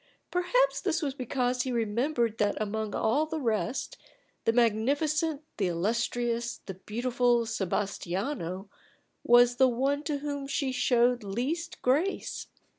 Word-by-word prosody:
Perhaps - - +2
this 330 -4 0
was 280 -2 -1
because 250 -1 -1
he 255 - -2
remembered 235 +1 0
that 205 -1 +1
among 215 0 -2
all 285 +8 +2
the 320 0 -3
rest, 230 0 -1 0.5
the - - +4
magnificent, 285 +7 +1
the 195 - +1
illustrious, 235 +6 -1
the 190 - -5
beautiful 240 +4 +1
Sebastiano 195 - -2 0.6
was 245 0 +6
the 260 0 +6
one 270 +4 0
to 290 0 -1
whom 285 -1 -4
she 275 -1 -1
showed 245 -1 +3
least 270 - -3
grace. 305 +10 0
245 Hz, 125 wpm, -29 LUFS, 220-285 Hz, 0.6 s, was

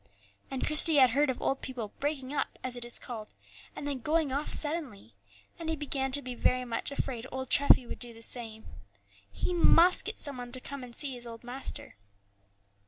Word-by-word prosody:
And 265 -1 -3
Christie 310 +1 +6
had 260 -4 +6
heard 285 +3 +2
of 255 - -2
old 270 - -1
people 235 -5 -6
"breaking 285 -2 -3
up," - - -2
as 255 -1 -3
it 245 - -4
is 240 0 -1
called, 220 - -8 0.4
and - - -7
then 280 -2 -3
going 305 +2 0
off 285 +3 -2
suddenly; 290 - 0 0.5
and 330 -1 -5
he 320 - 0
began 275 -3 -2
to 285 +1 +3
be 255 - -6
very 255 +1 0
much 230 -2 -2
afraid 260 -3 -4
old 260 0 -6
Treffy 280 -3 +6
would - - -8
do 240 -1 -5
the 230 0 -12
same. 225 -2 0 0.7
He 360 - -2
must 350 +1 +5
get - - -5
some 280 -3 +1
one 245 -1 -8
to 255 - 0
come 275 +1 -7
and 240 -1 -10
see 280 -3 +2
his 240 -1 -2
old 230 0 -10
master. 245 - -4
260 Hz, 205 wpm, -29 LUFS, 240-285 Hz, 0.7 s, Christie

